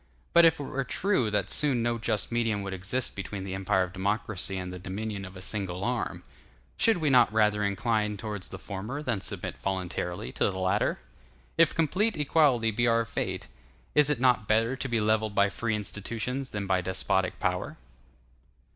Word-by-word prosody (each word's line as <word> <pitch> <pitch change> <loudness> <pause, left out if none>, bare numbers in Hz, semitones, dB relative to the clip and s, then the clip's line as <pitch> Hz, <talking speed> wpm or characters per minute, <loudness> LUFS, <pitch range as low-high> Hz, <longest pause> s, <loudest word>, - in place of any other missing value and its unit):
But 170 0 +8
if 160 -1 +4
it - - -3
were 135 0 -2
true 130 - +1
that 105 -2 0
soon 135 -6 +2
no 120 0 0
just 110 -1 -1
medium 115 -4 0
would 95 -1 -4
exist 100 +7 -2
between 100 0 -5
the 95 -1 -5
empire 95 0 +1
of 90 0 -6
democracy 95 0 -1
and 90 -1 -5
the 90 - -7
dominion 100 +2 -4
of 95 0 -10
a 95 - -6
single 95 -2 -3
arm, - - -2 0.5
should 225 -4 +3
we 155 -4 +1
not 125 -4 +6
rather 105 -1 +3
incline 105 +1 0
towards 105 -2 -5
the - - -8
former 110 +9 -5
than 115 -8 -1
submit - - -5
voluntarily 90 -7 -3
to - - 0
the 95 - -5
latter? 95 +2 +1
And - - -26 0.5
if 165 -2 +5
complete 185 +8 +1
equality 140 -6 +3
be 120 +3 +1
our 115 0 +3
fate, - - -3 0.5
is 150 -1 +5
it 145 -5 +1
not 125 -4 +3
better 115 +4 +2
to 135 0 -4
be 115 -1 +1
levelled 110 0 +1
by 100 0 +4
free 110 +2 -1
institutions 115 +6 -4
than 105 -1 -3
by 95 -1 +2
despotic 95 0 0
power? - - -1
105 Hz, 190 wpm, -28 LUFS, 95-125 Hz, 0.5 s, But